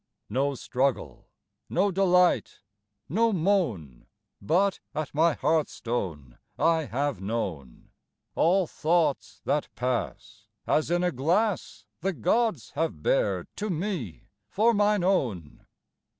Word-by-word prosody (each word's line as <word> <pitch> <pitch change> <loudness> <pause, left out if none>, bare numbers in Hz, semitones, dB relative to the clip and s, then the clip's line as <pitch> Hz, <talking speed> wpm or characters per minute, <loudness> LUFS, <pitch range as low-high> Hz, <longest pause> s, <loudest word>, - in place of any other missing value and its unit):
No 140 +4 0
struggle, 130 +2 -2 0.4
no 195 +3 +2
delight, 180 -1 +2 0.5
no 225 - +2
moan, 160 - -1 0.3
But 185 - +2 0.2
at 155 -1 -3
my 160 +2 +3
hearthstone 110 - -2 0.2
I 165 -2 +2
have 140 -1 -2
known! 95 - -5 0.4
All 185 +3 +3
thoughts 160 -2 0
that 150 0 0
pass, 125 -1 -3 0.2
as 155 - +1
in 175 +1 +1
a 180 - +2
glass 170 - 0
The 195 +2 -1
gods 175 - 0
have 165 0 -3
bared - - +1
to 210 +1 -3
me 170 - -3 0.3
for 225 - +3
mine 205 -2 +2
own. 115 - -1
160 Hz, 110 wpm, -27 LUFS, 125-190 Hz, 0.5 s, my